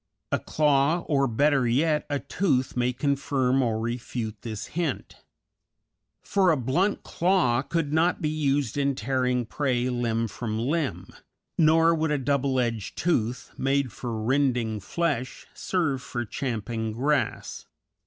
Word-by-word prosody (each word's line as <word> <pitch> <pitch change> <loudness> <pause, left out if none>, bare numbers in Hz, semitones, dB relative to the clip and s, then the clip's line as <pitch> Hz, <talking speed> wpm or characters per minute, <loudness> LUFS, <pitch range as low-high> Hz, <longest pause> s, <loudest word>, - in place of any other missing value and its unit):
A - - +1
claw, 150 +2 +2
or, 140 -4 +1
better 135 +2 +2
yet, 150 +6 +1
a 145 - 0
tooth, 140 -2 0
may 125 0 +1
confirm 135 -1 +1
or 115 -3 0
refute 115 -1 -4
this 110 -3 -5
hint; 165 -5 -3 1.1
for 190 -2 +2
a 160 - +3
blunt 140 - 0
claw 170 -9 +2
could 150 0 -2
not 165 +3 +2
be 155 - -1
used 145 -4 0
in 140 -1 +1
tearing 125 0 0
prey 125 0 0
limb 115 -2 0
from 110 0 -4
limb, 140 +5 -2 0.5
nor 165 +1 +5
would 160 -1 0
a 150 - +1
double 135 0 0
edged 115 -4 -2
tooth, 125 -8 -1
made 135 -1 +1
for 115 -1 -5
rending 120 -2 +1
flesh, 135 - -2
serve 160 -8 -1
for 120 -1 -4
champing 115 -2 -3
grass. 130 +1 -1
135 Hz, 135 wpm, -26 LUFS, 120-150 Hz, 1.1 s, nor